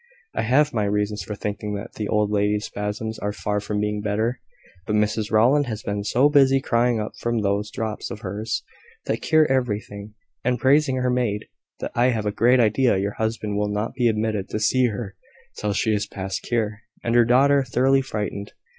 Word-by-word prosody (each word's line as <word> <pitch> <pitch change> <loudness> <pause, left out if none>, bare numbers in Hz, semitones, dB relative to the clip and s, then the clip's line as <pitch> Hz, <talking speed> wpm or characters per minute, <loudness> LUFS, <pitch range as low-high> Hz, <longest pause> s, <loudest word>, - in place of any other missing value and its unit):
I - - -1
have 140 +6 +3
my 105 -2 +1
reasons 105 +1 -1
for 105 - -5
thinking 105 0 -4
that 105 +4 -7
the 105 - -4
old 105 -1 +1
lady's 105 0 +1
spasms 105 +2 -4
are 105 - -2
far 105 0 -2
from 105 0 -3
being 105 0 -1
better. 110 +4 -1 0.5
But 105 - 0
Mrs 105 0 0
Rowland 130 +6 +4
has 110 -2 -5
been 100 0 -2
so 120 +7 +3
busy 135 -2 +5
crying 120 -2 +1
up 105 - -3
those 105 -3 0
drops 110 -2 -4
of 105 - -7
hers, 105 +3 -3 0.4
that - - -2
cure 155 -1 +4
everything, 105 -5 -2 0.3
and 125 0 +1
praising 135 +3 +3
her 125 -1 0
maid, 115 -4 -1 0.4
that - - -3
I 120 - +2
have 115 -4 0
a 105 - +1
great 120 +4 +4
idea 115 0 +3
your 100 +1 -1
husband 110 -2 -1
will 105 0 0
not 105 +2 -2
be 125 -2 +1
admitted 110 -3 -1
to 110 - -2
see 125 +3 +3
her 105 -2 -5 0.4
till 105 - -1
she 110 +2 +1
is 105 - -1
past 95 -1 -4
cure, 110 -3 -2 0.2
and 115 - 0
her 120 0 +6
daughter 135 +4 +4
thoroughly 130 +2 +2
frightened. 105 -5 -4
110 Hz, 195 wpm, -23 LUFS, 105-125 Hz, 0.5 s, her